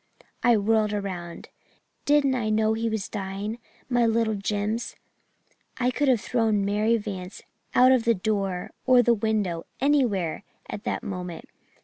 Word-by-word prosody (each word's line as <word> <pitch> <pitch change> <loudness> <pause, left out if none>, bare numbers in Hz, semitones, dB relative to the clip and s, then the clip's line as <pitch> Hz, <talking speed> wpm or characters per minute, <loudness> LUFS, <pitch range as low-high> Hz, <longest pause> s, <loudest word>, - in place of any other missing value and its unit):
"I 240 -2 +4
whirled 215 0 +2
around. 185 -4 -5 0.6
Didn't 290 -2 +3
I 235 -4 -1
know 215 0 +2
he 225 +1 -1
was 220 -3 -3
dying 200 +3 -5 0.3
my 245 -2 +2
little 225 -1 +1
Jims! 210 +3 -2 0.8
I 250 0 +1
could 290 +3 0
have 255 -4 +4
thrown 220 -3 +1
Mary 210 +3 +2
Vance 195 -3 -7 0.3
out 255 +1 +7
of 255 -3 +4
the 230 -1 +3
door 195 -2 -2 0.2
or 250 -1 +6
the 240 - +4
window 205 -6 -1
anywhere 240 - +1 0.2
at 205 - -7
that - - -2
moment. 180 -3 -6
215 Hz, 145 wpm, -25 LUFS, 200-235 Hz, 0.8 s, out